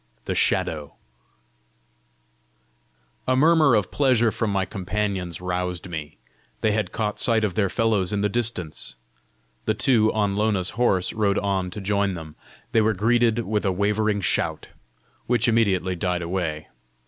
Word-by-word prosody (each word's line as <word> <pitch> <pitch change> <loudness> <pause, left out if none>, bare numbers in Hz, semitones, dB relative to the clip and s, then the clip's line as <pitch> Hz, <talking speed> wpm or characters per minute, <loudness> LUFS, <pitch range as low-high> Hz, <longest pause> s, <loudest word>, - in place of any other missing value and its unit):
THE - - -1
SHADOW 75 -3 0 2.3
A 130 - +3
murmur 155 -2 +5
of 105 -4 0
pleasure 125 -5 +3
from 110 - -2
my 100 -1 0
companions 95 -3 -3
roused 90 0 -3
me: 80 -3 -7 0.4
they 110 - +2
had 105 -3 -1
caught 105 -2 -2
sight 110 0 +3
of 105 -4 0
their 100 0 +1
fellows 105 -4 +1
in 105 -1 -1
the 105 - +2
distance! 100 - -2 0.7
The 110 - +1
two 115 -2 +3
on 105 -2 0
Lona's 100 -3 0
horse 95 -6 +1
rode 105 -2 +1
on 95 -2 -1
to 105 +3 -7
join 100 -1 0
them. 80 -2 -8 0.4
They 115 - +4
were 110 +1 +2
greeted 115 +2 +2
with 105 +1 -1
a 95 - +1
wavering 105 +2 0
shout - - -1 0.6
which 120 0 +2
immediately 100 -5 +2
died 90 0 -1
away. 85 -3 -3
105 Hz, 150 wpm, -24 LUFS, 90-110 Hz, 2.3 s, murmur